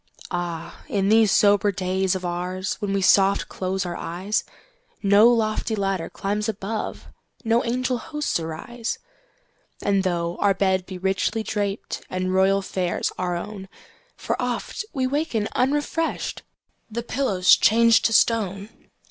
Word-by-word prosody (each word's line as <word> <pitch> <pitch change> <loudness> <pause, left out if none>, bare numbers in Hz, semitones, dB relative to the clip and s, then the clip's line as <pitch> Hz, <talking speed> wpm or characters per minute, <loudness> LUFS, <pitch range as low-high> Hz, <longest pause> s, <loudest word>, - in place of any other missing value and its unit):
Ah, 175 -2 -5
in 195 -1 +1
these 220 -1 +5
sober 205 0 +4
days 190 0 0
of 185 - -4
oursWhen 185 +3 -3
we 195 -1 0
soft 195 +1 +4
close 190 0 -2
our 175 - -4
eyes, 185 +5 -2 0.6
No 200 +3 +6
lofty 220 -1 +1
ladder 195 -4 -1
climbs 210 +2 -2
above, 215 +1 -4 0.4
No 230 0 +2
angel 250 +1 -1
hosts 300 - -2
arise. 175 +9 -5 0.9
And 200 -1 +2
tho 170 -2 -1
our 200 -1 +3
bed 190 -1 +1
be 185 - -6
richly 195 +4 0
drapedAnd 195 -3 -3
royal 195 +1 +3
fares 185 -2 -1
our 180 -1 -1
own, 195 +1 -6 0.5
For - - -2
oft - - -3
we 265 -5 -1
waken 255 -6 -1
unrefreshed—The 280 -4 -3
pillow's 220 -8 +3
changed 230 +1 +5
to 225 - +3
stone! 205 -3 +2
200 Hz, 130 wpm, -23 LUFS, 185-225 Hz, 0.9 s, No